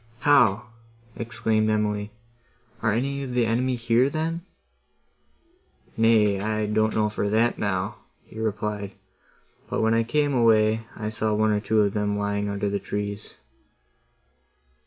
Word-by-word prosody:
"How!" 120 -6 +4 0.5
exclaimed 110 -2 0
Emily, 105 -1 -1 0.7
"are 110 - +2
any 140 +5 -1
of 130 -3 -5
the 120 -2 +3
enemy 125 +3 0
here, 120 +2 +2
then?" 165 +3 -2 1.5
"Nay, 110 -3 +3
I 110 +1 -1
don't 110 +1 +1
know 110 -1 +2
for 105 -1 -2
that, 115 +3 +1
now," 100 0 -2 0.3
he 110 - -12
replied, 105 -2 -3 0.8
"but - - -1
when 110 0 +3
I 115 - +3
came 145 +4 0
away 110 -2 +3
I 105 -1 -4
saw 110 -1 -1
one 110 0 +2
or 105 - +1
two 110 0 +1
of 100 -1 +1
them 105 -1 -1
lying 100 0 -1
under 100 0 -2
the 100 0 -1
trees." 105 0 -5
110 Hz, 140 wpm, -25 LUFS, 105-115 Hz, 1.5 s, How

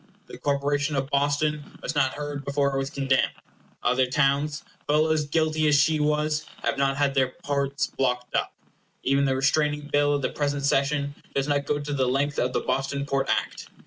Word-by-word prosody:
The - - -11
corporation 145 +1 0
of 135 +1 -2
Boston 145 +1 0
was - - -2
not 135 -3 +1
heard 145 -1 -5
before 140 0 0
it - - 0
was 135 0 -2
condemned. 135 -2 +1 0.5
Other 130 +1 +2
towns, 145 +2 +1 0.2
full 155 +2 +3
as 155 -2 +1
guilty 155 0 +1
as 145 -1 +5
she 155 +2 +3
was, 150 0 0 0.2
have 140 - +1
not 135 0 +1
had 140 -1 +2
their 130 -2 +1
ports 140 -2 0
blocked 125 -2 -2
up. - - 0 0.5
Even 140 +1 +2
the 135 -1 +1
Restraining 150 +2 +1
Bill 145 0 +3
of 140 - -2
the - - +1
present 145 -1 -1
session 140 +1 +1 0.2
does 135 0 0
not 145 -1 0
go 150 - +1
to 145 0 -4
the 130 -2 +1
length 140 +3 0
of 125 - +1
the - - 0
Boston 140 +1 -1
Port 135 -1 -1
Act. - - -1
140 Hz, 195 wpm, -25 LUFS, 135-150 Hz, 0.5 s, as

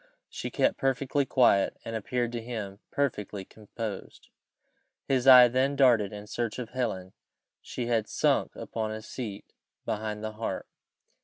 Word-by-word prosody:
She - - -5
kept - - +1
perfectly 135 +1 0
quiet, 120 -7 +3
and 115 - -4
appeared 120 +2 -1
to 120 -1 -4
him 110 -4 -6
perfectly 105 -8 -2
composed. 110 0 -8 0.8
His 130 -1 +1
eye 125 -2 +10
then 130 +3 +1
darted 120 -7 +4
in 105 0 -8
search 115 +1 -3
of 125 -3 -5
Helen; 110 -8 -3 0.5
she 125 - -5
had 115 -3 0
sunk - - +1
upon 110 -1 -4
a 110 0 -6
seat 110 -4 -7 0.3
behind 105 0 -3
the 110 - -3
harp. 110 +1 -4
115 Hz, 145 wpm, -28 LUFS, 105-125 Hz, 0.8 s, eye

